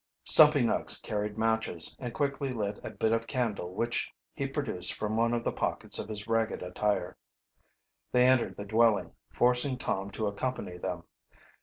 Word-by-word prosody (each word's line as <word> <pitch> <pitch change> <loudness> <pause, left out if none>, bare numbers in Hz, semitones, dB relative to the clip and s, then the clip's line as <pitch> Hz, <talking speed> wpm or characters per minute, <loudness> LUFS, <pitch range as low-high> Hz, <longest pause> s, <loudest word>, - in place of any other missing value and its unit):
Stumpy 150 -2 +6
Nuggs 115 - +2
carried 105 0 -3
matches, 110 -7 +1
and 125 -2 -5
quickly 140 0 -2
lit 105 -4 -3
a - - -5
bit 110 - -1
of 115 0 0
candle 105 -8 -2
which 120 +2 -1 0.2
he 140 -2 -3
produced 135 - 0
from 110 0 -2
one 115 +1 +2
of 120 -1 -1
the - - 0
pockets - - 0
of - - -5
his 105 -1 -5
ragged 115 -3 0
attire. 100 +3 -1 0.9
They 125 0 +4
entered 130 -2 +3
the 100 - -6
dwelling, 110 +1 +2 0.2
forcing 125 +2 +2
Tom 100 -4 -2
to 110 0 -2
accompany 100 -3 -3
them. - - -4
115 Hz, 165 wpm, -29 LUFS, 105-125 Hz, 0.9 s, Stumpy